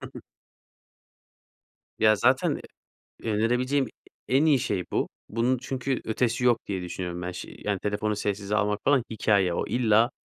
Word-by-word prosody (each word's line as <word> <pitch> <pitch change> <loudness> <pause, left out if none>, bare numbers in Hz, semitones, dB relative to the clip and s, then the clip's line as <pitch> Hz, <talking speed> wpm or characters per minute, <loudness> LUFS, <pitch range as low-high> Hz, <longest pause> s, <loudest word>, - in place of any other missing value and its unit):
Hı - - -9
hı. - - -7 1.8
Ya 110 0 +5
zaten 130 +5 +2 0.6
e 115 - -2
önerebileceğim 125 +6 +1 0.4
e 130 - 0
en 150 +4 +4
iyi 145 -4 +5
şey 100 -8 -1
bu. - - 0 0.2
Bunun 120 +4 +1
çünkü 130 +1 -2
ötesi 115 +2 0
yok 120 -2 +5
diye 95 -3 -3
düşünüyorum 90 0 -5
ben. 90 +1 -3
Şi 90 - -8
yani 100 -2 0
telefonu 105 +1 -1
sessize 100 0 -1
almak 105 0 +1
falan 140 -4 +4
hikâye. 100 -5 +2
O, - - -1
illa 115 0 +3
110 Hz, 160 wpm, -26 LUFS, 100-125 Hz, 1.8 s, Ya